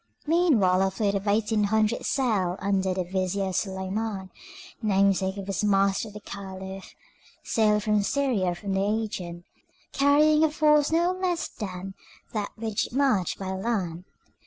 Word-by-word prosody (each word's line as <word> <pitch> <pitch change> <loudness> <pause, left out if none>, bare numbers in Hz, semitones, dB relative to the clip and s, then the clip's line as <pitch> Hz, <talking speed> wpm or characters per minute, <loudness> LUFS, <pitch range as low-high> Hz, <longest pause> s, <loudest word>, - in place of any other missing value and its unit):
Meanwhile 280 - +3
a 195 - +3
fleet 200 +1 -1
of 200 +1 -3
eighteen 210 +1 +2
hundred 220 +2 +1
sail 210 -10 +1
under 195 -1 0
the 185 0 -1
vizier 190 +1 -2
Suleiman, 190 +1 -3 0.5
namesake 195 -2 +2
of 195 - -5
his 195 +1 -2
master 195 +1 +2
the 210 0 -9
Caliph, 190 -1 -8 0.5
sailed 210 -2 +2
from 210 -1 +2
Syria 205 -7 0
for 190 +4 -11
the 195 0 0
Aegean, 200 -5 -3 0.5
carrying 300 +2 +4
a 315 - +4
force 300 -1 +3
no 340 +2 +3
less 365 -2 -1
than 190 -1 -7 0.4
that 210 -2 -2
which 220 -2 -2
marched 255 - +1
by 190 -1 -4
land. 190 -4 -2
200 Hz, 140 wpm, -26 LUFS, 190-225 Hz, 0.5 s, carrying